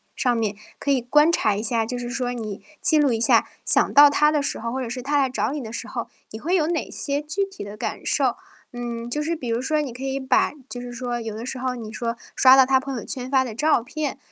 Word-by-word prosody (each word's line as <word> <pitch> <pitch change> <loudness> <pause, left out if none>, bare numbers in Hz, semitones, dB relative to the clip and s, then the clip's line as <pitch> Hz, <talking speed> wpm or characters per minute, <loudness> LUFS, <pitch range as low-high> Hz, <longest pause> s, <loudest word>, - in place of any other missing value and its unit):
上 245 -2 +1
面， 215 -2 -1 0.2
可 285 - 0
以 265 -2 +2
观 295 +6 +4
察 220 -10 +2
一 200 - -2
下， 225 0 +1
就 245 +3 -4
是 240 0 -5
说 250 -1 -2
你 215 -5 -5 0.2
记 365 -5 +3
录 290 -3 +4
一 225 - 0
下 230 - +4 0.2
想 - - +3
到 290 0 +9
他 300 +1 +3
的 300 -1 +1
时 280 - -2
候， 230 +1 -4
或 265 +2 -3
者 245 - -4
是 250 +2 -4
他 285 +3 0
来 270 -1 +2
找 225 -2 -1
你 295 - -3
的 225 -2 -8
时 - - -5
候， - - -4 0.2
你 220 - -8
会 345 +9 0
有 315 -4 +2
哪 335 -2 -2
些 285 +1 -2
具 310 +7 -2
体 390 - -7
的 205 +1 -8
感 215 - -4
受。 - - +1 0.4
嗯， 240 -1 -5
就 295 +5 -2
是 325 +3 -1
比 255 -7 -6
如 230 +1 0
说 305 +3 0
你 280 -4 -4
可 250 +2 -10
以 270 0 -2
把 265 -1 +2 0.2
就 245 - -6
是 245 0 -7
说 240 0 -3
有 225 -2 -5
的 225 +2 -6
时 255 0 -5
候 255 0 -2
你 225 -3 -7
说 230 +1 -3 0.2
刷 260 0 +8
到 265 -1 +7
他 265 0 +3
朋 270 0 -5
友 235 - -5
圈 255 -2 -5
发 265 -1 +3
的 245 -4 -6
照 290 0 +2
片， 295 +2 -4
255 Hz, 300 characters per minute, -23 LUFS, 235-290 Hz, 0.4 s, 到